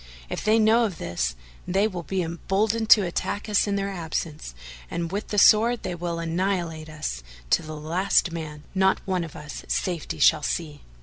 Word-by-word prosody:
If -, -, -3 dB
they 215 Hz, +1 st, +4 dB
know 225 Hz, +2 st, +4 dB
of 190 Hz, -7 st, -4 dB
this, 65 Hz, -9 st, -2 dB, 0.3 s
they 195 Hz, +4 st, +2 dB
will 185 Hz, -5 st, -5 dB
be 185 Hz, +3 st, -2 dB
emboldened 205 Hz, +7 st, -1 dB
to 210 Hz, -4 st, +8 dB
attack 190 Hz, +4 st, -3 dB
us 210 Hz, -1 st, +2 dB
in 200 Hz, -, 0 dB
their 200 Hz, 0 st, -1 dB
absence 160 Hz, -, -4 dB, 0.3 s
and 170 Hz, 0 st, -3 dB
with 205 Hz, +2 st, -3 dB
the 210 Hz, -, -3 dB
sword 225 Hz, +4 st, +5 dB
they -, -, -3 dB
will 170 Hz, -1 st, -3 dB
annihilate 165 Hz, -2 st, -2 dB
us 150 Hz, -, -4 dB, 0.3 s
to -, -, +4 dB
the 155 Hz, 0 st, -7 dB
last 170 Hz, +3 st, +1 dB
man; 155 Hz, -3 st, -6 dB
not 190 Hz, 0 st, +3 dB
one 185 Hz, -2 st, 0 dB
of 165 Hz, -, -9 dB
us 150 Hz, -1 st, -8 dB
safety 175 Hz, -5 st, -2 dB
shall 150 Hz, -, +5 dB
see. 150 Hz, -1 st, -3 dB
175 Hz, 185 wpm, -25 LUFS, 155-200 Hz, 0.3 s, to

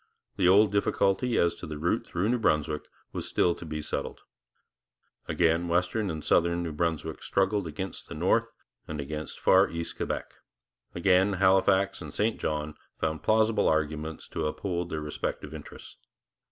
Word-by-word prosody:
The 95 Hz, -3 st, +2 dB
old 100 Hz, +2 st, +6 dB
difficulty 100 Hz, +3 st, +1 dB
as 85 Hz, 0 st, +3 dB
to 85 Hz, -, -9 dB
the 75 Hz, -1 st, -5 dB
route 85 Hz, +4 st, 0 dB
through 95 Hz, +5 st, -1 dB
New 125 Hz, 0 st, +2 dB
Brunswick 75 Hz, -6 st, 0 dB, 0.3 s
was -, -, -4 dB
still 85 Hz, -, +2 dB
to -, -, -10 dB
be 75 Hz, 0 st, -4 dB
settled. -, -, -4 dB, 1.1 s
Again 85 Hz, 0 st, +2 dB
western 90 Hz, +5 st, 0 dB
and 80 Hz, -2 st, -4 dB
southern 85 Hz, 0 st, +2 dB
New 85 Hz, -, -3 dB
Brunswick 80 Hz, 0 st, -2 dB
struggled 95 Hz, -1 st, +1 dB
against 95 Hz, +5 st, -6 dB
the -, -, -6 dB
north -, -, +2 dB, 0.4 s
and 80 Hz, -1 st, -5 dB
against 75 Hz, +2 st, -5 dB
far 95 Hz, +2 st, +5 dB
east 85 Hz, 0 st, -5 dB
Quebec; -, -, -3 dB, 0.6 s
again 95 Hz, +3 st, +3 dB
Halifax 95 Hz, 0 st, +3 dB
and 75 Hz, -4 st, -7 dB
St 110 Hz, +6 st, 0 dB
John 75 Hz, 0 st, -2 dB, 0.3 s
found 80 Hz, -1 st, -1 dB
plausible 110 Hz, +2 st, +3 dB
arguments 80 Hz, 0 st, -2 dB
to -, -, -2 dB
uphold 85 Hz, +2 st, -3 dB
their 80 Hz, -3 st, -3 dB
respective 75 Hz, 0 st, -4 dB
interests. 75 Hz, -2 st, -10 dB
85 Hz, 155 wpm, -28 LUFS, 80-95 Hz, 1.1 s, old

